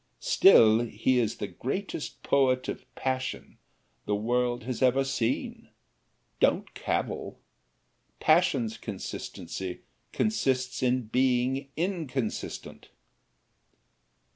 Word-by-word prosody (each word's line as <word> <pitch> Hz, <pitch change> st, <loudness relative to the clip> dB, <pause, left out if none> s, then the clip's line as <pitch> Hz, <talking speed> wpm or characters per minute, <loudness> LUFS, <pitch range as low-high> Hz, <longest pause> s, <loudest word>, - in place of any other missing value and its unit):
Still 115 Hz, -, +6 dB
he 120 Hz, +2 st, +1 dB
is 115 Hz, -3 st, 0 dB
the -, -, -3 dB
greatest -, -, -5 dB
poet 130 Hz, -2 st, +2 dB
of -, -, -5 dB
passion 130 Hz, -1 st, -3 dB, 0.5 s
the 105 Hz, -, +1 dB
world 120 Hz, +3 st, 0 dB
has 125 Hz, +1 st, -4 dB
ever 130 Hz, +1 st, +4 dB
seen 130 Hz, -3 st, -2 dB, 0.7 s
don't -, -, +2 dB
cavil -, -, -3 dB, 0.8 s
passion's 140 Hz, -9 st, +3 dB
consistency 95 Hz, -2 st, -6 dB, 0.3 s
consists 130 Hz, -12 st, 0 dB
in 125 Hz, 0 st, +2 dB
being 130 Hz, +3 st, +1 dB
inconsistent. 155 Hz, -, -3 dB
130 Hz, 90 wpm, -28 LUFS, 115-135 Hz, 0.8 s, Still